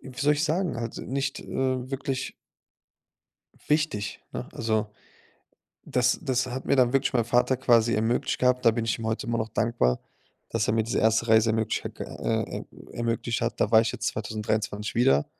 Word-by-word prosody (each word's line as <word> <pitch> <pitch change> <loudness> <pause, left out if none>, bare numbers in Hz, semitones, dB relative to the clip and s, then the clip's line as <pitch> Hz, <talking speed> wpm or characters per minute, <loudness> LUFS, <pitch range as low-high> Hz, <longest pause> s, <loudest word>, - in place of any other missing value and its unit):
wie 130 -1 -11
soll 145 +1 +4
ich 150 +2 0
sagen? 170 0 0
Halt 115 0 -4
nicht, 135 +1 -3
äh, - - -12 0.4
wirklich 135 -1 -3 1.4
wichtig, 150 -10 0
ne? - - -5
Also, 110 -1 0 1.0
das 125 0 +1
das 130 -5 0
hat 130 +1 -5
mir - - +3
dann 125 -2 +4
wirklich 135 0 +1
mein 120 -2 +3
Vater 125 +2 +2
quasi 120 -2 +3
ermöglicht 110 +3 0
gehabt. 125 0 +2
Da 115 - +7
bin 115 0 -2
ich 115 0 -1
ihm 115 - -5
heute 110 +1 -2
immer 115 0 0
noch 110 - -1
dankbar, 110 - +1 0.5
dass 115 -1 0
er - - +2
mir 110 0 +2
diese 115 - -1
erste 110 +1 +2
Reise 110 0 +5
ermöglich 110 0 -1
ha - - +1
g - - -7
äh, - - -2
äh, - - -9 0.3
ermöglicht 115 0 -1
hat. 115 0 -2
Da - - +2
war 110 - +8
ich 115 0 0
jetzt - - -3
2023 110 -1 -2
wieder, 75 - +3
115 Hz, 190 wpm, -26 LUFS, 110-130 Hz, 1.4 s, war